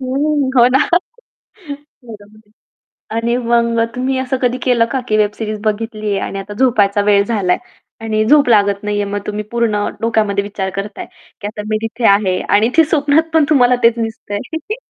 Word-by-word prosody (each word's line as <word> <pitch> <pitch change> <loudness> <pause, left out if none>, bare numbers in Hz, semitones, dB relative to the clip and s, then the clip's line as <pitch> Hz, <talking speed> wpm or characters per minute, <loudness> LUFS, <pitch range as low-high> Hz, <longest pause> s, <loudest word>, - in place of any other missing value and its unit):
हं, 275 +2 0
हो 240 -1 +7
ना 260 +1 +3 1.3
रंगवली. 215 -1 -14 0.7
आणि 235 +1 0
मग 235 -1 +1
तुम्ही 260 +1 -1
असं 260 0 -2
कधी 250 0 +1
केलं 245 -3 +2
का, 265 - -1
की 215 - +2
वेब 210 -1 +2
सीरीज 215 -1 -4
बघितली 215 0 -2
आहे 200 - 0
आणि 195 - -5
आता 195 +1 -7
झोपायचा 210 -6 +2
वेळ 200 -1 +3
झालाय 200 -5 0 0.4
आणि 215 -1 -1
झोप 285 +3 +4
लागत 200 -3 +3
नाहीये. 205 0 -1
मग 205 0 -4
तुम्ही 210 0 -4
पूर्ण 225 -3 0
डोक्यामध्ये 215 -3 0
विचार 195 -2 -4
करताय, 200 +1 -5 0.3
की 205 - -5
आता 210 0 -6
मी 215 - 0
तिथे 230 +2 -4
आहे 200 -2 +2
आणि 210 +3 +3
ते 325 - +6
स्वप्नात 300 +1 +1
पण 315 -2 +5
तुम्हाला 250 -4 +4
तेच 230 0 +5
दिसतं 225 -2 -5
आहे. 320 - -5
225 Hz, 175 wpm, -16 LUFS, 205-250 Hz, 1.3 s, हो